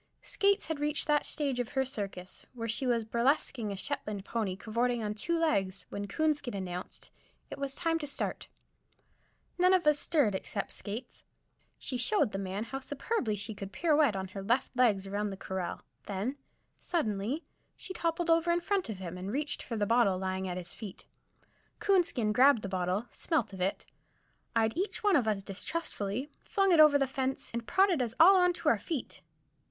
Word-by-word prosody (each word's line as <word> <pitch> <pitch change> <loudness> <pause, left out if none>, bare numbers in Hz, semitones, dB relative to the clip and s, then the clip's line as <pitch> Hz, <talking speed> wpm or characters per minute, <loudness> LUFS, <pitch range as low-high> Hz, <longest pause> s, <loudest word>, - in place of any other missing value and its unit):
Skates 400 0 +2
had 320 -2 -3
reached 295 0 0
that 300 -1 +2
stage 280 -5 -1
of 245 - -1
her 265 0 0
circus 195 -7 -6
where 230 -2 -4
she 230 +4 -1
was 235 -2 +1
burlesquing 235 -1 +1
a - - -3
Shetland 210 -4 -3
pony 215 -5 -1
cavorting 235 +3 -1
on 210 0 -1
two 335 +11 -1
legs, 195 - 0
when 200 0 -4
Coonskin 290 0 0
announced 180 -2 -6 0.4
it - - -6
was 275 -1 -3
time 330 -1 +1
to 295 - -4
start. 280 - -3 1.1
None 365 +1 +6
of 355 -3 +1
us 300 -1 +4
stirred, 290 - +2
except 200 +1 -3
Skates. 225 +5 -6 0.6
She 255 - -3
showed 325 - +2
the 195 - -3
man 195 +2 -3
how 270 +4 -5
superbly 275 - -2
she 210 +2 -4
could 195 -1 -7
pirouette 300 - +3
on 190 -1 -3
her 195 +1 -6
left 240 +7 0
legs 220 -6 +3
around 205 +2 -2
the 195 - -6
corral; 190 -2 -4 0.2
then, 205 +7 -2 0.4
suddenly, 235 - -1 0.3
she 375 - -6
toppled 335 0 0
over 330 +1 +4
in 340 - +3
front 380 - -1
of 215 - -4
him, 180 -1 -6
and 190 +2 -4
reached 290 +4 -2
for 235 - -5
the 210 -2 +1
bottle 230 -4 +3
lying 190 0 -2
at 180 0 -3
his 175 -1 -5
feet. 210 -5 -9 0.7
Coonskin 335 - +2
grabbed 255 -1 +5
the - - -2
bottle, 185 +3 -1
smelt 290 -11 -1
of 190 - -7
it, 190 +2 -1 0.7
eyed 225 -1 +2
each 385 +5 -2
one 405 -3 +4
of 250 -7 +3
us 205 -2 0
distrustfully, 215 - -4
flung 390 -2 +2
it 335 - +5
over 305 -2 +8
the 275 - +2
fence, 265 0 -3
and 235 -1 -4
prodded 380 -6 +3
us 235 -1 -2
all 375 +4 +9
on 360 -1 +5
to - - -5
our - - +4
feet. 310 -8 -5
240 Hz, 190 wpm, -31 LUFS, 200-305 Hz, 1.1 s, all